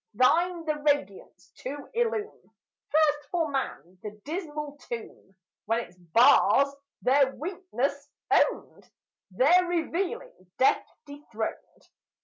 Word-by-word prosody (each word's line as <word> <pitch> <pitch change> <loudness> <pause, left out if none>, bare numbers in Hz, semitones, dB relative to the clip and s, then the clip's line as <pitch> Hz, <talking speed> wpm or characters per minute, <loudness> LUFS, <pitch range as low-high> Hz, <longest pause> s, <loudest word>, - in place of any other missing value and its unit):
Thine 335 - +2
the 305 -1 -1
radiance 290 -10 -2
to 280 +2 -7
illume 450 -2 -2 0.4
First, 295 -1 +2
for 330 -4 -1
man, 185 - -4
the 210 0 -8
dismal 300 -3 -5
tomb, 225 -4 -8 0.3
When 225 +2 +1
its 205 - -12
bars 245 - +4 0.3
their 265 0 +3
weakness 290 -5 -3 0.2
owned, - - +1 0.4
There 295 - +4
revealing 350 - -3
death 260 - +3 0.2
dethroned. 285 -7 -7
290 Hz, 105 wpm, -27 LUFS, 245-335 Hz, 0.4 s, bars